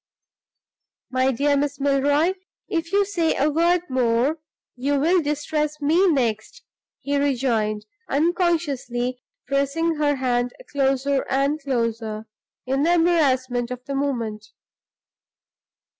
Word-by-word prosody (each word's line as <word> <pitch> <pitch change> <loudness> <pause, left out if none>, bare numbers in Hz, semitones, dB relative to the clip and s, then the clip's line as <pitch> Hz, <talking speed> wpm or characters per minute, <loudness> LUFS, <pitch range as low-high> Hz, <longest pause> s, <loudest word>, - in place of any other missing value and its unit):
"My 260 +1 +2
dear 285 +3 +1
Miss 285 0 -1
Milroy, 285 +5 +2 0.3
if 330 -1 -2
you 400 0 +3
say 340 -5 0
a 295 +3 +1
word 340 +3 +3
more 255 +4 +1 0.4
you 275 +3 0
will 345 +5 +3
distress 300 0 -2
me 325 +7 +3
next," 235 -8 -1 0.4
he 285 0 -1
rejoined, 235 -6 0 0.2
unconsciously 285 -7 0 0.2
pressing 280 +5 0
her 290 -1 +2
hand 245 -2 0 0.2
closer 275 0 +1
and 275 +3 +1
closer, 230 -5 -2 0.4
in 270 +2 0
the 340 +4 +3
embarrassment 260 -8 +2
of 250 0 -7
the 280 - -4
moment. 230 -7 -2
280 Hz, 115 wpm, -23 LUFS, 250-305 Hz, 0.4 s, you